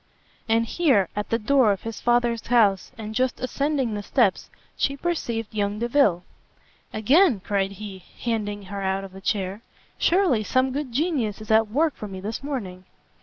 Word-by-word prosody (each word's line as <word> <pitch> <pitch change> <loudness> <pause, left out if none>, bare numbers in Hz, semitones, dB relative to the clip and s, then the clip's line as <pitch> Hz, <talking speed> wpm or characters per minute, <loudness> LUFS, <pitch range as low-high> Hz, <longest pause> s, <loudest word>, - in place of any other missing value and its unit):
And 225 +1 +3
here, 230 - +2
at 210 0 -3
the 230 - +2
door 245 0 +3
of 195 - -3
his 225 -1 -6
Father's 240 -1 +1
house, 215 -6 +3
and 220 -1 -6
just 255 +2 0
ascending 270 -2 -1
the 205 - -3
steps, 205 -2 +1 0.3
she 275 0 0
perceived 235 -10 -3
young 205 -1 -1
Delvile. 235 -6 +2 0.7
"Again!" 260 - +4
cried 195 0 -1
he, 195 -2 -9 0.2
handing 205 -3 -2
her 200 +1 -6
out 190 0 -1
of 195 - -9
the 190 +1 -11
chair, 195 0 -2 0.4
"surely 345 - +3
some 255 +4 +1
good 280 -1 -3
genius 260 - -1
is 215 0 -6
at 220 0 +5
work 300 +6 +1
for 210 - -7
me 190 -1 -7
this 215 +5 -5
morning!" 200 -11 -5
225 Hz, 170 wpm, -24 LUFS, 200-260 Hz, 0.7 s, at